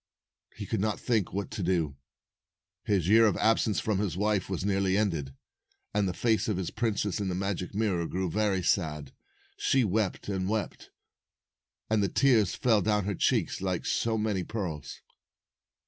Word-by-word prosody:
He - - -6
could - - -2
not 110 +1 -1
think 110 -6 0
what 100 +2 -4
to 110 - -4
do. 85 -6 0 0.9
His 95 -5 +1
year 110 +3 +6
of 105 - +1
absence 110 -1 +2
from 105 -3 0
his 95 -5 -2
wife 105 -2 0
was 95 0 -2
nearly 95 -1 +1
ended, 80 -11 -1 0.6
and 105 -1 +1
the 90 - -2
face 115 -2 +1
of 105 -4 0
the 95 -2 -3
princess 110 -3 -1
in 100 - -2
the 90 - -2
magic 95 0 -3
mirror 95 -6 0
grew 95 +1 -2
very 100 0 0
sad. 75 -7 0 0.5
She 135 -1 +2
wept 105 -1 -1
and 95 -2 -2
wept, 110 -1 -3 1.0
and 110 -1 +2
the 100 - +1
tears 115 -9 +3
fell 110 -4 +3
down 105 -1 +1
her 100 - -1
cheeks 90 - 0
like 95 -2 -2
so 115 -1 0
many 105 -4 -1
pearls. 90 -9 -5
100 Hz, 170 wpm, -29 LUFS, 90-110 Hz, 1.0 s, year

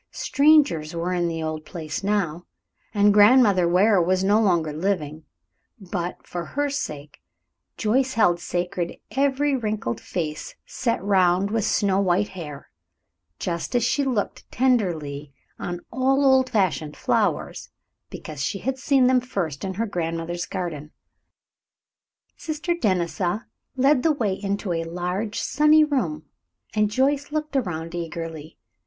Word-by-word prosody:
Strangers 280 - +3
were 170 +2 -2
in 175 -1 0
the 165 -1 -3
old 155 0 -4
place 155 +1 -6
now, 180 -5 -1 0.4
and 205 0 +4
Grandmother 205 -4 +6
Ware 190 +3 +4
was 185 +2 +1
no 205 +3 +4
longer 170 -7 +1
living, 155 -3 -2 0.5
but, 180 -3 -5
for 175 -1 -5
her 285 +8 -2
sake, 150 - -5 0.6
Joyce 255 +4 +1
held 175 -6 +3
sacred 175 0 -3
every 280 +1 +1
wrinkled 215 - -3
face 155 -3 -4
set 230 -6 -2
round 190 0 +3
with 220 -2 0
snow 195 -2 +2
white 195 +1 +1
hair, 150 -6 -9 0.7
just 170 +7 -3
as 240 - +3
she 280 +4 +1
looked 245 -7 -2
tenderly 160 - 0 0.3
on 175 0 -4
all 270 +2 +2
old 265 -1 +4
fashioned 160 - 0
flowers, - - -1 0.4
because 150 -3 -8
she 195 - -1
had 265 +6 -3
seen 270 -2 +3
them 255 0 +4
first 180 - -4
in 190 -1 -3
her 225 +4 -1
grandmother's 170 -2 -3
garden. 165 -6 -5 1.5
Sister 315 +2 -2
Denisa 185 - -1 0.3
led 270 +1 +4
the 325 - +3
way 220 -9 0
into 200 -1 -3
a 165 0 -1
large, 180 +6 -3
sunny 300 +2 +4
room, 210 - -1 0.5
and 210 -1 +2
Joyce 275 +5 0
looked 305 -1 -3
around 170 -9 -2
eagerly. 165 -2 -6
190 Hz, 135 wpm, -24 LUFS, 170-250 Hz, 1.5 s, Grandmother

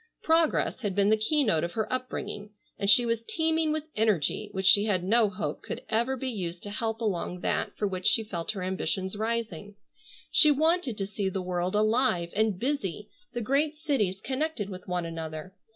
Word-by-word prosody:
Progress 325 -4 +2
had 205 -6 -3
been 200 0 +3
the 220 - +6
keynote 220 - +2
of 170 - -3
her 220 -1 0
upbringing, 250 -5 -4 0.3
and 200 - 0
she 240 +5 +7
was 230 -1 0
teeming 320 +4 0
with 310 0 -1
energy 210 -2 +1
which 190 -1 -3
she 200 +1 +6
had 190 -5 +1
no 220 +3 +3
hope 205 +2 -4
could - - -6
ever 235 +4 +1
be 265 - -4
used 180 -8 -4
to 205 - -6
help 225 0 -2
along 180 -4 -2
that - - -1
for 210 - 0
which 185 -1 -2
she 225 - +4
felt 175 -5 -5
her 190 -3 -5
ambitions 190 +1 -2
rising. 215 -3 -3 0.6
She 305 - +7
wanted 310 -4 +2
to 195 - -1
see 200 -1 -2
the 190 0 -3
world 180 +1 -1
alive, 215 -5 +2
and 215 -2 +2
busy, 210 - -2 0.2
the 240 - -2
great 285 +6 +1
cities 265 - 0
connected 265 -6 -2
with 185 -1 -9
one 180 -1 -1
another. 160 +1 -6
210 Hz, 190 wpm, -28 LUFS, 185-250 Hz, 0.6 s, she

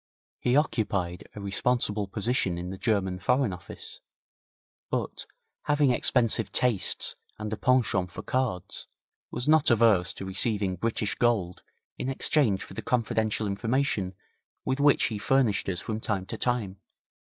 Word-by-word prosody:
He 125 - +2
occupied 95 - -1
a - - -6
responsible 105 +1 0
position 100 -3 0
in 90 +1 -5
the 95 - -6
German 95 -5 0
Foreign 125 +2 +2
Office, 90 -1 -9 0.9
but, - - -3 0.4
having 145 -2 +3
expensive 115 -2 +2
tastes 120 -6 +1 0.2
and 105 0 -4
a - - 0
penchant 115 -7 +2
for - - -8
cards, 125 -9 -2 0.4
was 125 - -4
not 155 0 +5
averse 110 -6 +4
to 95 - -6
receiving 100 0 0
British 110 +2 -1
gold 105 -7 +1 0.4
in 130 - -2
exchange 135 -6 +2
for - - -11
the - - -5
confidential 110 -3 0
information 100 -2 0 0.5
with 130 +1 0
which 145 0 +5
he 110 -3 -1
furnished 120 -4 +2
us 90 -2 -2
from 110 +3 -4
time 100 -4 -2
to - - -6
time. 110 -6 -1
110 Hz, 140 wpm, -28 LUFS, 95-125 Hz, 0.9 s, not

